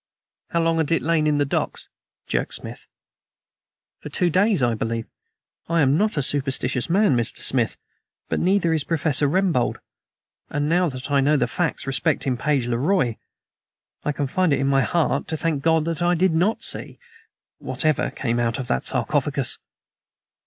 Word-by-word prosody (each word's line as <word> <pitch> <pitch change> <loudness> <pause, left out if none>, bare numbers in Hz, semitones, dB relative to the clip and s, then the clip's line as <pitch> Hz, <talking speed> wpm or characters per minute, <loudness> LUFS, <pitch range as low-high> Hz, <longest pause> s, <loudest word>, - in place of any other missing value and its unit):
"How 170 - 0
long 165 0 +1
had 160 0 0
it 165 - +2
lain 160 -2 +2
in 150 -1 +2
the 145 - +2
docks?" 140 - -3 0.4
jerked - - -1
Smith. - - -7 1.1
"For - - -8
two 175 +4 +1
days, 190 - +3
I 120 -1 +2
believe. 115 0 -3 0.6
I 170 -1 +2
am 135 0 +4
not 210 +1 +1
a 145 - +1
superstitious 130 -1 -1
man, 190 -5 +3
Mr. 120 -2 -2
Smith, - - 0 0.5
but - - -1
neither 180 -2 +2
is 155 -3 0
Professor 150 -2 +1
Rembold, 175 -7 +1 0.7
and 145 0 -1
now 175 +2 +2
that 130 +1 -7
I 140 -1 +4
know 150 +2 +3
the - - +2
facts 175 -5 -2
respecting 135 -1 0
Page 140 0 0
le 120 -1 -1
Roi, 140 - +1 0.8
I 150 - 0
can 145 0 -2
find 180 +5 +1
it 140 - +2
in 135 - 0
my 135 0 +3
heart 145 -2 0
to 160 -1 -2
thank 155 -3 -1
God 160 0 +2
that 165 -1 -3
I 175 +1 +3
did 180 0 +2
not 180 +7 +1
see... - - -3 0.6
whatever 155 -2 0
came 120 -2 -2
out 115 -1 0
of 130 - -4
that 65 - 0
sarcophagus." - - 0
150 Hz, 175 wpm, -23 LUFS, 135-170 Hz, 1.1 s, am